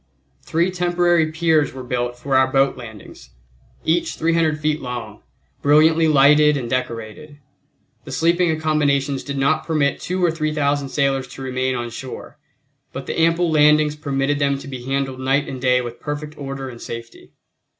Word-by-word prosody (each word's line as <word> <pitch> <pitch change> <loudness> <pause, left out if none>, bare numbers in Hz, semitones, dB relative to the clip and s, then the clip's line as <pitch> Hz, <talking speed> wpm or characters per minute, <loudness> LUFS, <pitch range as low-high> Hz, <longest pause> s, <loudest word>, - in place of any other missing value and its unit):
Three 170 +3 0
temporary 175 -2 +1
piers 160 -3 +1
were 130 -1 -7
built 120 -1 -3
for 135 +2 -2
our 130 0 +4
boat 135 0 +2
landings, 110 - -12 0.6
each 170 +2 0
300 165 -2 +1
feet 155 0 -1
long, 120 -4 -6 0.4
brilliantly 160 +3 +4
lighted 150 0 +5
and 125 -3 -4
decorated. 125 +4 -4 0.7
The - - -8
sleeping 170 +1 +2
accommodations 145 -3 0
did 140 -1 -5
not 155 +3 +1
permit 155 -3 0
two 185 0 -1
or 170 - +2
three 155 -1 -2
thousand 140 -2 0
sailors 135 -1 0
to 135 +2 -10
remain 130 0 -1
on 120 -1 -4
shore, 130 +2 -9 0.5
but - - -7
the - - -3
ample 165 +1 +2
landings 150 0 +4
permitted 145 -1 -1
them 140 -1 +1
to 140 - -10
be 130 -3 -7
handled 135 -1 -2
night 135 +2 +1
and 130 -2 -6
day 125 -1 +3
with 120 -1 -7
perfect 150 +1 -5
order 135 -2 -6
and 120 -2 -10
safety. 115 0 -9
140 Hz, 165 wpm, -20 LUFS, 130-155 Hz, 0.7 s, lighted